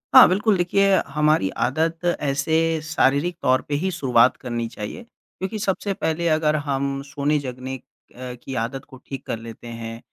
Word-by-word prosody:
हाँ, 260 - +11
बिल्कुल। 205 +1 +2
देखिए 195 +2 +3
हमारी 150 -7 +2
आदत 160 +5 0
ऐसे 145 -2 0 0.3
शारीरिक 155 +2 +1
तौर 130 -1 +3
पे 145 - -3
ही 190 - 0
शुरुआत 130 -7 +3
करनी 120 -2 -3
चाहिए। 115 - -7
क्योंकि 215 -2 -8
सबसे 200 0 -1
पहले 165 0 -1
अगर 155 -1 +2
हम 140 -1 -1
सोने-जगने 135 -3 -2 0.4
अ, 125 0 -6
की 135 - -6
आदत 130 +4 -4
को 130 - -12
ठीक 135 -2 -6
कर 115 - -3
लेते 115 +1 -10
हैं, 115 0 -7
140 Hz, 160 wpm, -23 LUFS, 130-170 Hz, 0.4 s, हाँ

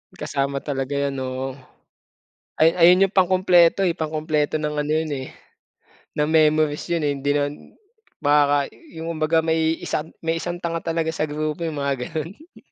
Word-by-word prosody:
Kasama 140 0 -2
talaga 135 -1 -4 0.2
'yan, 135 - -4
oo. 130 +1 -4 1.0
Ay 160 +1 +5
ayun 180 +3 +6
'yung 200 - -19
pangkumpleto, 185 0 +4
eh, 170 - 0
pangkumpleto 155 -1 -1
ng 150 0 -2
ano 150 - -3
'yun, 160 0 +1
eh, 130 -1 -6 0.9
ng 150 +1 0
memories 155 -1 +2
'yun, 170 -2 -1
eh. 145 - +1
Hindi 140 +1 -1
naman 145 0 0 0.7
baka 145 -1 +3
'yung 165 - -9
kumbaga 160 +1 +2
may 160 0 +1
isang 155 +2 -3
may 165 0 -1
isang 175 +1 -5
tanga 170 -1 -2
talaga 165 -1 -1
sa 160 -1 -1
grupo, 155 +3 -3
'yung 150 -3 -3
mga 135 -3 -1
gano'n. 190 - -7
155 Hz, 160 wpm, -22 LUFS, 145-165 Hz, 1.0 s, ayun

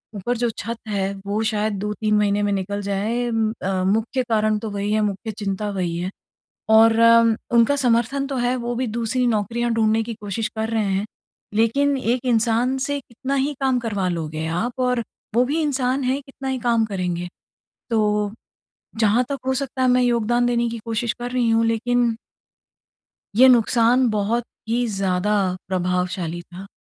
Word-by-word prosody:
ऊपर 235 +5 -2
जो 240 0 +1
छत 230 +2 -4
है, 195 -2 -1
वो 205 +2 -1
शायद 215 0 -1
2-3 210 +1 -1
महीने 205 0 +2
में 205 - +1
निकल 200 +1 -2
जाए 210 +5 -1
उम, 225 -1 +1
अ, 185 0 0
मुख्य 225 +7 0
कारण 215 -1 +2
तो 220 - -5
वही 200 0 -2
है, 215 - +2
मुख्य 210 +2 -2
चिंता 205 0 -2
वही 180 -4 -2
है। 180 +2 -2 0.7
और 225 +1 +7
उम, 230 0 +6 0.2
उनका 235 +5 +5
समर्थन 255 +1 +1
तो 275 -1 -4
है, 245 0 +1
वो 240 0 -3
भी 255 +2 -1
दूसरी 235 +2 -1
नौकरियाँ 235 +2 0
ढूँढने 220 0 +2
की 230 +1 -5
कोशिश 210 +2 -3
कर 220 0 -1
रहे 225 -2 0
हैं। 195 0 0 0.5
लेकिन 275 +6 +2
एक 250 0 -1
इंसान 235 +2 +2
से 285 0 -1
कितना 260 +2 -5
ही 275 +2 +1
काम 265 -2 +2
करवा 205 -6 -2
लोगे 160 -2 -3
आप, 180 +10 -1
और 250 -1 +1 0.3
वो 245 +2 +4
भी 295 +6 -1
इंसान 265 -2 0
हैं, 260 +2 0
कितना 270 0 -8
ही 265 -1 -1
काम 235 -1 +2
करेंगे? 180 -4 -3 0.6
तो, 210 -2 +1 0.7
जहाँ 225 +3 +3
तक 280 - -3
हो 265 - +1
सकता 260 -1 -2
है 255 - +4
मैं 250 0 +4
योगदान 240 0 +2
देने 235 -1 +1
की 230 - -5
कोशिश 230 0 -1
कर 245 0 -4
रही 245 -2 +1
हूँ, 225 0 +3
लेकिन 235 +1 +1 1.2
ये 260 +3 +8
नुकसान 245 +1 +4
बहुत 215 +3 0 0.2
ही 240 +2 +1
ज़्यादा 195 0 0 0.3
प्रभावशाली 180 -2 -1
था। 180 +3 -11
225 Hz, 175 wpm, -22 LUFS, 205-245 Hz, 1.2 s, ये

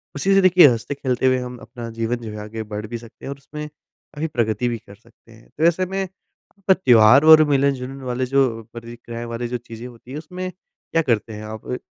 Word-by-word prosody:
उसी 190 +8 +1
से 195 - +5
देखिए 185 -3 +7
हँसते 120 +2 -1
खेलते 130 -2 -1
हुए 130 0 +3
हम 125 0 -6
अपना 120 -1 -8
जीवन 115 +1 -2
जो 115 -2 -8
है 105 - -8
आगे 110 +1 -6
बढ़ 105 +1 -4
भी 120 +1 -5
सकते 115 0 -14
हैं - - -5
और 140 - -6
उसमें 150 +2 -8
काफ़ी 150 +1 -9
प्रगति 120 -4 -1
भी 120 - -2
कर 100 -2 -15
सकते 115 +1 -24
हैं। 110 0 -18
तो 155 - -1
ऐसे 180 +2 +1
में 195 +1 -3
अप 190 +1 -6
त्योहार 125 - +6
और 155 0 +9
मिलन-जुलन 135 -1 0
वाले 130 0 -2
जो 135 +1 +3 0.3
प्रतिक्रियाएँ 120 0 -8
वाली 120 +1 -3
जो 125 +1 -3
चीज़ें 115 +1 -10
होती 120 +1 -14
हैं 145 - -5
उसमें 180 +4 -6
क्या 170 -2 -4
करते 115 -6 -1
हैं 105 - -8
आप? 110 0 -8
अ, 125 - -2
125 Hz, 225 wpm, -21 LUFS, 115-150 Hz, 0.3 s, और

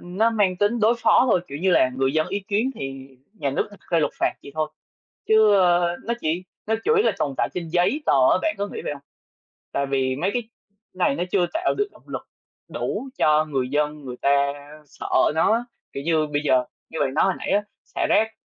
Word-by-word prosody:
nó 195 +6 +1
mang 200 -5 +1
tính 210 +4 +1
đối 220 +3 +4
phó 255 - +4
thôi, 180 - +4
kiểu 140 +1 -6
như 185 +2 +1
là, 130 - +4
người 135 0 +1
dân 155 0 +1
ý 200 - -2
kiến 220 +6 +1
thì 135 0 -7 0.3
nhà 145 -9 -2
nước 135 - -1
đặt 205 - -15
ra 170 - +3
luật 150 - +1
phạt - - +1
vậy 140 - -11
thôi. 155 -1 -1 0.6
Chứ, 220 -1 +6
a, 175 -1 +3
nó 235 - -1
chỉ 165 +4 -1 0.2
nó 220 - +1
chủ 455 - +3
yếu 440 +1 +3
là - - +3
tồn 140 -2 -1
tại - - +1
trên 170 -2 -4
giấy 180 - +1
tờ - - +4 0.2
á, - - +3
bạn 210 - +1
có 205 0 -2
nghĩ - - -6
vậy - - -2
hông? 140 -1 -10 0.7
Tại 140 - 0
vì 130 -1 0
mấy 175 +7 0
cái 245 -1 -1 0.5
này 180 -6 +1
nó 175 - -1
chưa 180 -3 +3
tạo 345 +2 +1
được 415 0 +1
động - - -20
lực - - -6 0.4
đủ 270 - -4
cho 155 0 +3
người 135 -4 -2
dân 150 +1 -1
người 125 -1 -7
ta 140 0 +3 0.4
sợ 145 - -9 0.3
nó 160 - +3
á. 230 - +2 0.3
Kiểu 140 - -5
như, 155 -1 +1
bây 145 0 -1
giờ, 130 -3 +3 0.3
như - - -5
bạn 135 -2 0
nói 155 - +3
hồi 190 - +2
nãy - - -5
á, 205 - +2 0.2
xả - - -3
rác 220 +1 +3
170 Hz, 235 wpm, -23 LUFS, 140-210 Hz, 0.7 s, Chứ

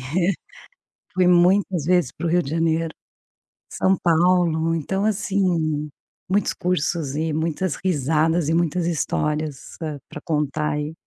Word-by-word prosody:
assim, 170 +9 0 0.8
fui 185 -1 +3
muitas 180 -2 +3
vezes 175 -6 +2
para 170 - -6
o - - +1
Rio 175 +2 +3
de 135 - -6
Janeiro, 165 +1 +1 0.8
São 190 0 +1
Paulo, 165 -1 +2
então, 190 +6 -1
assim, 175 -8 0 0.4
muitos 200 +1 +1
cursos 165 -4 -1
e 160 +1 -1
muitas 160 +2 -1
risadas 160 -1 +1
e 160 - +1
muitas 170 0 +1
histórias 150 -2 -2
para 150 -5 -7
contar 150 -2 -1
aí. 150 +1 -3
165 Hz, 130 wpm, -22 LUFS, 150-180 Hz, 0.8 s, fui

